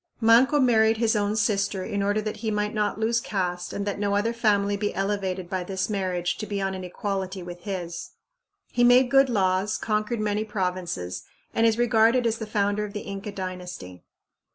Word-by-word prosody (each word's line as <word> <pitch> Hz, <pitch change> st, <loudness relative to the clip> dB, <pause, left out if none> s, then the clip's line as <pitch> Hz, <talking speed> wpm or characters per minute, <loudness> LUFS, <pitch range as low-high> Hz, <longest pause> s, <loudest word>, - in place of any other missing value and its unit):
Manco 245 Hz, +6 st, +5 dB
married 225 Hz, -4 st, +4 dB
his 225 Hz, 0 st, +2 dB
own 205 Hz, 0 st, 0 dB
sister 200 Hz, -2 st, 0 dB
in 200 Hz, +1 st, -2 dB
order 205 Hz, +2 st, +1 dB
that 215 Hz, 0 st, -4 dB
he 220 Hz, +1 st, -3 dB
might 210 Hz, 0 st, -1 dB
not 210 Hz, -1 st, -1 dB
lose 230 Hz, +1 st, +1 dB
caste 180 Hz, -4 st, -3 dB
and 200 Hz, -, -3 dB
that 205 Hz, -1 st, -3 dB
no 200 Hz, -1 st, 0 dB
other 220 Hz, +3 st, +1 dB
family 205 Hz, -3 st, +2 dB
be 205 Hz, +1 st, -2 dB
elevated 195 Hz, -2 st, -2 dB
by 185 Hz, 0 st, -2 dB
this 190 Hz, +2 st, -3 dB
marriage 180 Hz, -3 st, -1 dB
to 215 Hz, -, -4 dB
be 200 Hz, -1 st, -2 dB
on 195 Hz, 0 st, -1 dB
an 185 Hz, -1 st, -6 dB
equality 190 Hz, 0 st, -4 dB
with 175 Hz, +1 st, -9 dB
his. 180 Hz, -4 st, -5 dB, 0.6 s
He 245 Hz, -, +2 dB
made 245 Hz, +1 st, +6 dB
good 270 Hz, -1 st, +5 dB
laws, 195 Hz, -1 st, +1 dB
conquered 215 Hz, +1 st, -1 dB
many 210 Hz, 0 st, 0 dB
provinces, 180 Hz, -, -3 dB, 0.3 s
and 225 Hz, 0 st, +3 dB
is 225 Hz, 0 st, +2 dB
regarded 235 Hz, +1 st, +3 dB
as 225 Hz, -1 st, 0 dB
the 220 Hz, -, -5 dB
founder 205 Hz, 0 st, 0 dB
of 205 Hz, -1 st, -6 dB
the 210 Hz, -, -4 dB
Inca 200 Hz, +1 st, -6 dB
dynasty. 180 Hz, -, -7 dB
205 Hz, 195 wpm, -25 LUFS, 190-220 Hz, 0.6 s, made